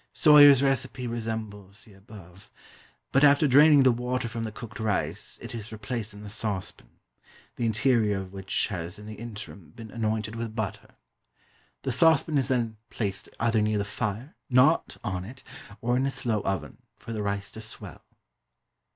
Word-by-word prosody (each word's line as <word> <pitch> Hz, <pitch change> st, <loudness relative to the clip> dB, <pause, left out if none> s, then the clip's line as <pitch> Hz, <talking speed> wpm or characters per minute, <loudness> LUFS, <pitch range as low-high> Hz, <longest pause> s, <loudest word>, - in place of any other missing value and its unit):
Soyer's 145 Hz, -3 st, +7 dB
recipe 135 Hz, -1 st, 0 dB
resembles 110 Hz, -4 st, -5 dB
the 105 Hz, -, -17 dB
above; 95 Hz, -2 st, -15 dB, 0.6 s
but, 135 Hz, -, +3 dB
after 145 Hz, +1 st, +6 dB
draining 145 Hz, +1 st, +7 dB
the 130 Hz, -, +6 dB
water 125 Hz, +1 st, -2 dB
from 115 Hz, 0 st, -4 dB
the 110 Hz, -, -5 dB
cooked 115 Hz, +2 st, -10 dB
rice, 110 Hz, -3 st, -2 dB
it -, -, -7 dB
is 110 Hz, -1 st, -7 dB
replaced 110 Hz, 0 st, -5 dB
in 105 Hz, 0 st, -11 dB
the 105 Hz, -, -8 dB
saucepan, 105 Hz, -4 st, -4 dB, 0.7 s
the 120 Hz, -, -1 dB
interior 110 Hz, -2 st, +2 dB
of 95 Hz, 0 st, -7 dB
which 95 Hz, +3 st, -1 dB
has 85 Hz, -3 st, -5 dB
in 105 Hz, -, -11 dB
the 110 Hz, -, -7 dB
interim 105 Hz, -7 st, -10 dB
been 110 Hz, -2 st, -10 dB
anointed 110 Hz, -1 st, -2 dB
with 115 Hz, -1 st, -5 dB
butter. 110 Hz, -4 st, -5 dB, 0.9 s
The -, -, -1 dB
saucepan 160 Hz, -2 st, +4 dB
is 130 Hz, -, -1 dB
then 120 Hz, -4 st, -1 dB
placed 100 Hz, -4 st, -3 dB
either 115 Hz, -2 st, +2 dB
near 105 Hz, 0 st, +1 dB
the 100 Hz, -, -1 dB
fire 105 Hz, +6 st, -4 dB, 0.2 s
(not 130 Hz, +6 st, +3 dB
on 90 Hz, -2 st, -3 dB
it), 125 Hz, +7 st, -11 dB, 0.4 s
or 120 Hz, +1 st, +1 dB
in 135 Hz, +1 st, +1 dB
a -, -, +1 dB
slow 115 Hz, -5 st, -1 dB
oven, 95 Hz, -1 st, -4 dB, 0.2 s
for 115 Hz, -, -8 dB
the 110 Hz, -, -3 dB
rice 100 Hz, 0 st, -3 dB
to 110 Hz, -, -9 dB
swell. 110 Hz, -, -8 dB
110 Hz, 170 wpm, -27 LUFS, 105-125 Hz, 0.9 s, Soyer's